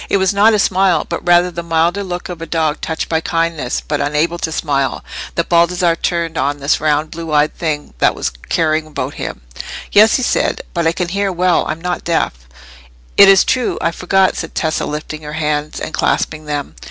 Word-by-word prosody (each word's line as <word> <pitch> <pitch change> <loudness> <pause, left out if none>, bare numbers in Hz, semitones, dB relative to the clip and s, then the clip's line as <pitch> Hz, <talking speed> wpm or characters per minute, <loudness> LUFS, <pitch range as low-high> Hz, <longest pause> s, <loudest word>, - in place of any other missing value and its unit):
It - - +3
was 190 +1 +2
not 210 +2 +5
a - - +3
smile, 190 -2 +2
but 170 - -4
rather 175 +1 +4
the 170 0 -5
milder 170 +4 +1
look 180 -2 -5
of 175 -2 -7
a 165 - -5
dog 160 -1 -1
touched 160 -1 -3
by 160 -1 0
kindness, 165 -6 -1
but 145 -1 -2
unable 150 +4 0
to 160 - -2
smile, 140 -4 -1 0.3
that 170 - 0
Baldassarre 170 0 +3
turned 170 -2 -1
on 140 +2 0
this 140 +1 0
round 155 0 +1
blue 165 -1 -6
eyed 150 0 +2
thing 150 - -3
that - - +3
was - - -2 0.2
caring 155 -1 +1
about 155 - -4
him. - - -6 0.5
"Yes," 215 +2 +6
he 260 - 0
said; - - 0
"but 170 -2 0
I - - +4
can 175 0 -3
hear 200 +1 0
well—I'm 175 -3 +1
not 180 0 -3
deaf." 170 - 0 0.8
"It 200 -1 +8
is 195 -2 +7
true; 255 -2 0
I 170 - 0
forgot," 190 +2 +2
said 165 - -6
Tessa, 160 -1 -1
lifting 150 +1 -5
her 150 0 -7
hands 150 -1 -2
and - - -6
clasping 155 -1 -1
them. 145 - -4
165 Hz, 200 wpm, -17 LUFS, 155-180 Hz, 0.8 s, It